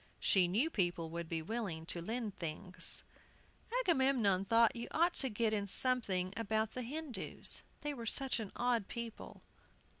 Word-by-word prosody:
She 185 -3 +4
knew 235 - +2
people 175 - 0
would 170 -1 -5
be 165 -1 -2
willing 190 -5 -3
to 170 0 0
lend 220 +2 -3
things. 170 +2 -1 0.8
Agamemnon 260 - +3
thought 230 +3 +4
you 235 0 -4
ought 340 +2 +2
to 265 - +3
get 220 0 0
in 200 -1 -1
something 195 -6 +1
about 220 -1 0
the 255 - -4
Hindoos, 280 +1 0 0.2
they 295 0 -2
were 235 -4 -6
such 265 +1 +1
an 215 -3 -5
odd 240 -4 +1
people. 235 -2 -7
220 Hz, 155 wpm, -35 LUFS, 185-250 Hz, 0.8 s, She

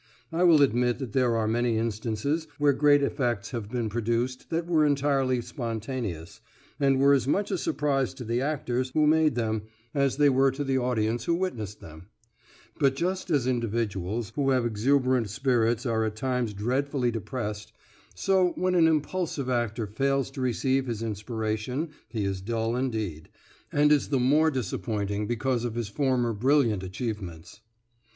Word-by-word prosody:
I 165 +2 -1
will 165 -5 +6
admit 125 -1 +2
that 130 -5 -6
there 125 -3 +2
are 110 -1 0
many 115 0 +1
instances 115 +8 -2
where 145 -1 +3
great 145 +1 +4
effects 120 -7 -1
have 115 -5 -5
been 120 -1 -2
produced 120 +3 -2
that 165 0 -1
were 165 -3 +3
entirely 135 -3 +2
spontaneous, 115 - -5 0.4
and 135 -2 +3
were 140 +1 +6
as 135 -3 +2
much 200 +8 0
a - - +1
surprise 140 -4 0
to - - -7
the 120 +2 -1
actors 130 -3 -1
who 155 - +4
made 155 -2 +3
them 110 -2 -1 0.3
as 140 -2 +1
they 145 0 +5
were 135 0 +4
to 145 +2 -3
the 135 -1 +1
audience 120 -2 0
who 170 - +2
witnessed 115 - -4
them; 80 +3 -12 0.7
but 135 -3 +3
just 185 +5 -2
as 145 -7 +2
individuals 115 -4 -2
who 140 -2 +1
have 130 -3 +2
exuberant 125 +1 +2
spirits 120 0 +1
are 115 -2 +1
at 110 -1 -2
times 125 -2 -1
dreadfully 125 +4 0
depressed, 105 -2 -5 0.4
so 185 - +2
when 185 0 0
an 170 -2 +5
impulsive 155 -3 -1
actor 120 -2 -1
fails 135 +6 0
to 135 - -6
receive 130 +2 0
his 115 -2 -3
inspiration 110 +6 -3 0.2
he 110 -3 -2
is 95 -1 -2
dull 115 +2 -1
indeed, 110 -11 -3 0.4
and 150 0 +3
is 150 -2 +3
the 140 - +2
more 145 +6 +4
disappointing 105 -4 -2
because 120 +1 -1
of 120 -2 -3
his 120 -3 -3
former 125 -1 +1
brilliant 120 -2 +2
achievements. 95 -3 -6
125 Hz, 165 wpm, -27 LUFS, 110-140 Hz, 0.7 s, will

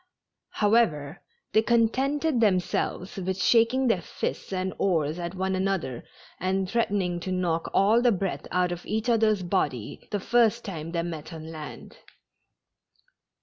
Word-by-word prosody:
However, 205 -10 +2 0.3
they 220 - +5
contented 255 +5 +1
themselves 185 -2 0
with 190 0 -2
shaking 235 +5 +4
their 225 -8 +2
fists - - -4
and 185 0 -2
oars 160 -4 +1
at 175 +1 -4
one 190 +1 -1
another, 185 -10 -1 0.4
and 190 +1 0
threatening 195 -5 0
to 185 +2 -5
knock 175 -3 -1
all 215 +5 +4
the 245 -1 +4
breath 195 -2 -2
out 180 0 +1
of 175 0 -5
each 220 +3 -1
other's 215 -4 +3
body 145 - -2
the 205 - -1
first 235 +2 +2
time 165 -5 -5
they 170 -1 -1
met 165 -2 -6
on 160 -1 -8
land. 155 -2 -9
190 Hz, 145 wpm, -26 LUFS, 175-225 Hz, 0.4 s, they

